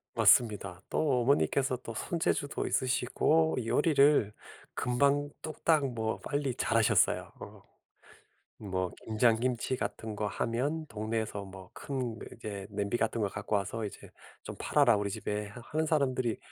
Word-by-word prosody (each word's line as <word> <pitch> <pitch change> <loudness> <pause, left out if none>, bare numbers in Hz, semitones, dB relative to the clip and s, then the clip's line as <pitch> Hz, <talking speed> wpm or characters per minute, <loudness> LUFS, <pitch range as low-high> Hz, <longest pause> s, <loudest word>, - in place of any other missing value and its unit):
맞습니다. 105 -4 +3
또 135 -6 +1
어머니께서 135 0 +2
또 115 -2 -8
손재주도 145 +2 -1
있으시고 135 +5 +1
요리를 140 -3 +4 0.4
금방 140 +4 +1
뚝딱 155 -4 +1
뭐 110 -1 -2
빨리 140 -3 -2
잘하셨어요. 115 -3 +2
어. - - -10 1.0
뭐 95 -3 -3
김장 110 +1 +3
김치 125 0 -1
같은 110 -3 -4
거 105 0 -2
하면 140 +10 -2
동네에서 110 -3 -3
뭐 95 -1 -12
큰 130 -5 -4
이렇게 100 -4 -7
냄비 100 +2 -1
같은 115 0 -1
거 105 - +2
갖고 105 +2 -2
와서 105 +3 -3
이제 100 - -8 0.4
"좀 - - -6
팔아라 - - +4
우리 100 0 -2
집에." 105 +1 -3
하 110 +4 -11
하는 155 +1 +1
사람들이 130 -6 +1
115 Hz, 290 characters per minute, -30 LUFS, 105-140 Hz, 1.0 s, 요리를